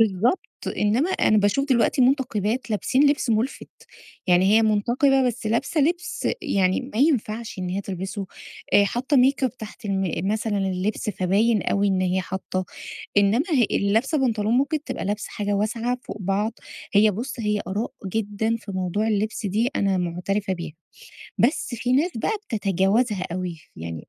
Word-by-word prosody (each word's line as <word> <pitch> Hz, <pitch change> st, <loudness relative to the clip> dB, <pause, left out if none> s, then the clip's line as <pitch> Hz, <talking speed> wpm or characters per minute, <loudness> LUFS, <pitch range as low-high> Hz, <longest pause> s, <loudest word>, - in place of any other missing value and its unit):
بالضبط. 220 Hz, -, +3 dB, 0.4 s
إنّما 235 Hz, -, +2 dB
أنا 215 Hz, -, +3 dB
باشوف 205 Hz, +8 st, +1 dB
دلوقتي 255 Hz, +1 st, +3 dB
مُنتقِبات 245 Hz, -3 st, +1 dB
لابسين 265 Hz, +7 st, +3 dB
لبس 285 Hz, -4 st, -1 dB
مُلفت. 225 Hz, +5 st, -1 dB, 0.6 s
يعني 180 Hz, 0 st, +4 dB
هي 225 Hz, -, +5 dB
مُنتقِبة 245 Hz, +5 st, +3 dB
بس 235 Hz, -3 st, -3 dB
لابسة 235 Hz, +8 st, 0 dB
لبس 345 Hz, +5 st, 0 dB
يعني 190 Hz, -, +1 dB
ما -, -, -2 dB
ينفعش 235 Hz, -7 st, 0 dB
إن 185 Hz, -1 st, -3 dB
هي 190 Hz, +2 st, -2 dB
تلبسه، 195 Hz, +1 st, -5 dB, 0.5 s
آآ 205 Hz, -, +6 dB
حاطّة 255 Hz, +7 st, 0 dB
make 265 Hz, +1 st, +4 dB
up 255 Hz, -, -7 dB
تحت 220 Hz, +2 st, -10 dB
الـم 190 Hz, -2 st, -1 dB
مثلًا 215 Hz, -1 st, -1 dB
اللبس 195 Hz, +2 st, -1 dB
فباين 200 Hz, +4 st, +2 dB
أوي 200 Hz, 0 st, +1 dB
إن 190 Hz, -1 st, +1 dB
هي 185 Hz, 0 st, +1 dB
حاطّة. 185 Hz, +1 st, -4 dB, 0.5 s
إنّما 205 Hz, -, +4 dB
ه 265 Hz, -7 st, +4 dB
اللي 200 Hz, 0 st, +1 dB
لابسة 265 Hz, +8 st, +2 dB
بنطلون 225 Hz, -4 st, +1 dB
ممكن 290 Hz, +2 st, 0 dB
تبقى -, -, -4 dB
لابسة 205 Hz, +1 st, -2 dB
حاجة 205 Hz, 0 st, -2 dB
واسعة 230 Hz, +4 st, -1 dB
فوق -, -, -7 dB
بعض. 200 Hz, +4 st, 0 dB, 0.4 s
هي 210 Hz, +1 st, +6 dB
بُص، 235 Hz, +5 st, -5 dB
هي 210 Hz, -1 st, 0 dB
آراء 205 Hz, +5 st, -2 dB
جدًا 220 Hz, +2 st, -1 dB
في 210 Hz, -3 st, -9 dB
موضوع 185 Hz, +3 st, -1 dB
اللبس 215 Hz, 0 st, -1 dB
دي 215 Hz, +5 st, +1 dB
أنا 195 Hz, -2 st, +1 dB
مُعترفة 180 Hz, +3 st, -2 dB
بيها. 170 Hz, -3 st, -5 dB, 0.7 s
بس 245 Hz, 0 st, +1 dB
في 245 Hz, +2 st, -1 dB
ناس 300 Hz, +8 st, +3 dB
بقى 225 Hz, -, 0 dB
بتتجاوزها 200 Hz, 0 st, +1 dB
أوي. 180 Hz, -1 st, -3 dB, 0.2 s
يعني 80 Hz, 0 st, -7 dB
215 Hz, 160 wpm, -24 LUFS, 195-245 Hz, 0.7 s, آآ